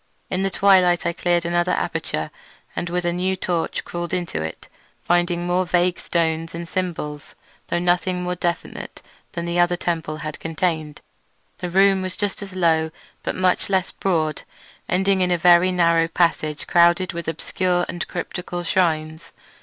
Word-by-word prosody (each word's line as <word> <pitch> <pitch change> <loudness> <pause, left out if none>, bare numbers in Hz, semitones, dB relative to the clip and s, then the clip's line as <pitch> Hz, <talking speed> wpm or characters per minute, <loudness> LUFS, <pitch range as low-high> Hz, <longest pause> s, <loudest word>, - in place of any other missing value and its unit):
In 185 0 0
the 195 - +1
twilight 185 -3 +4
I 170 - +1
cleared 175 0 +1
another 175 +1 +1
aperture - - -2 0.4
and 170 - -3
with 175 0 -1
a 175 - +1
new 185 +2 0
torch 175 -2 -2
crawled 175 +1 -3
into 175 - -3
it, 80 0 -6 0.4
finding 175 0 +1
more 180 +1 +2
vague 180 0 +1
stones 165 -1 -1
and 170 0 -5
symbols, 165 -6 -4 0.3
though - - 0
nothing 180 +1 +1
more 180 0 -1
definite 175 -1 -4 0.3
than 170 - -3
the 170 0 -1
other 175 0 +4
temple 165 -3 -2
had 155 -1 -6
contained. 160 -2 -2 0.6
The 180 - -3
room 195 +1 +4
was 185 0 -4
just 205 -1 -2
as 195 -2 -8
low, 160 -3 +2 0.3
but - - -3
much 185 +1 +1
less 190 -1 +1
broad, 160 -5 -1 0.5
ending 190 +1 +2
in 180 - +2
a 175 - +2
very 175 +2 +5
narrow 170 -2 +3
passage 165 -3 0
crowded 175 +1 +4
with 170 -1 -5
obscure 175 +2 0
and 175 - -4
cryptical 175 -1 -4
shrines. 160 -2 0
175 Hz, 160 wpm, -22 LUFS, 165-180 Hz, 0.6 s, very